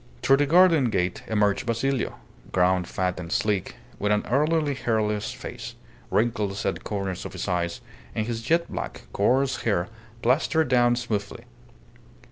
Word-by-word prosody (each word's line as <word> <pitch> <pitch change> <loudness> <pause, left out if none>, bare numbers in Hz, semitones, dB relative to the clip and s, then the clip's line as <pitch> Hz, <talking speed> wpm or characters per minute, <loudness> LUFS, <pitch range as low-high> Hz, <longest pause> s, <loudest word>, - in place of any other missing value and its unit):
Through 135 - +5
the 145 0 +2
garden 165 -5 +5
gate 90 -4 -1
emerged 105 0 +1
Basilio, 120 +3 0 0.4
grown 90 0 +2
fat 90 0 -2
and 85 -1 -7
sleek, 100 -3 0 0.2
with 105 +1 +1
an 105 - +1
elderly 150 +3 +2
hairless 110 -4 -1
face, - - -8 0.3
wrinkles 105 -3 0
at - - +2
the - - -10
corners 95 -3 -3
of - - -7
his - - -4
eyes, 85 -2 -1 0.3
and 110 - 0
his 115 0 -3
jet 165 +7 +1
black, - - -5
coarse 130 +6 +2
hair 100 -4 0 0.3
plastered 145 +4 +2
down 120 -1 +4
smoothly. 115 -2 -3
110 Hz, 150 wpm, -25 LUFS, 100-135 Hz, 0.4 s, Through